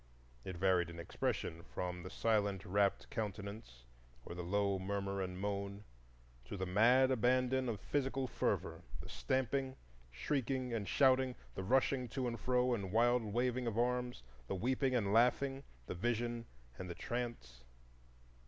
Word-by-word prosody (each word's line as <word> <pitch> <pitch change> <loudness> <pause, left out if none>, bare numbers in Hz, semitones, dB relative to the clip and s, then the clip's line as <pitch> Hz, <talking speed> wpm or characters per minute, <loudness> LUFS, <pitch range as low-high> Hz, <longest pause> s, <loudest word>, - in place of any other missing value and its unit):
It 95 -2 -5
varied 90 -2 +3
in 85 - -9
expression 85 0 -2
from 90 0 -4
the 90 - -7
silent 100 -3 +1
rapt 100 +1 +2
countenance 100 - -5 0.4
or - - -6
the 90 - -5
low 100 +2 +1
murmur 100 0 -2
and 90 -1 -3
moan 100 0 -3 0.6
to 100 - -6
the 95 - -1
mad 120 +8 +5
abandon 130 +1 +2
of 110 -4 -2
physical 135 +2 -1
fervor,—the - - -3
stamping, 130 0 0 0.3
shrieking, 130 - -1
and 105 -4 -2
shouting, 130 +2 +4 0.2
the - - -4
rushing 130 +3 +2
to 130 -2 +1
and 115 -2 -3
fro 125 +3 +2
and 100 -5 -2
wild 120 +2 +4
waving 120 +3 0
of 115 -1 -2
arms, 125 - 0 0.2
the - - -2
weeping 130 +5 +1
and 100 -4 +1
laughing, 135 +4 +3 0.2
the - - -4
vision 120 +4 -1 0.3
and 90 - -5
the 85 - -5
trance. 115 - -4
115 Hz, 145 wpm, -36 LUFS, 95-125 Hz, 0.6 s, mad